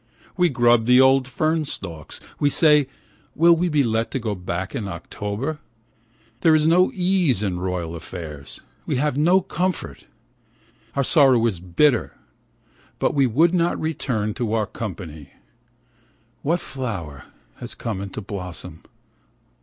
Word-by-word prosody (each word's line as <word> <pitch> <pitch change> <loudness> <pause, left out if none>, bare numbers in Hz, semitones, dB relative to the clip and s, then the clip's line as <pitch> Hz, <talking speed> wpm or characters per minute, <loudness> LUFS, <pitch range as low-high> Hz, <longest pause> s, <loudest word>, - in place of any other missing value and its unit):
We 180 -2 +3
grub 120 -4 +3
the 125 +1 +6
old 130 0 +5
fern 155 +3 0
stalks. 85 - -7 0.2
We 145 - +3
say: 150 -2 +4 0.5
Will 170 +3 +6
we 175 +2 0
be 150 -3 +2
let 115 -1 0
to 135 - -3
go 110 -3 -2
back 90 0 -4
in 105 - -3
October? 105 - -5 0.8
There 160 +2 +5
is 155 -1 +2
no 175 +3 +4
ease 180 - +1
in 90 -3 -2
royal 90 -2 -3
affairs, 80 -4 -9 0.3
we - - 0
have 145 +1 0
no 175 +6 +4
comfort. 180 0 -3 0.9
Our 140 - +2
sorrow 130 -5 +5
is 100 -7 -1
bitter, 115 - +1 0.8
but - - 0
we 140 -2 +3
would 160 +9 +3
not 170 -1 +1
return 120 -9 -2
to 115 -2 -3
our 110 -2 +1
country. 85 -10 -8 1.1
What 170 +4 0
flower 95 - -6 0.3
has - - -5
come 105 -5 -4
into 100 +2 -6
blossom 95 -3 -7
125 Hz, 140 wpm, -22 LUFS, 95-155 Hz, 1.1 s, the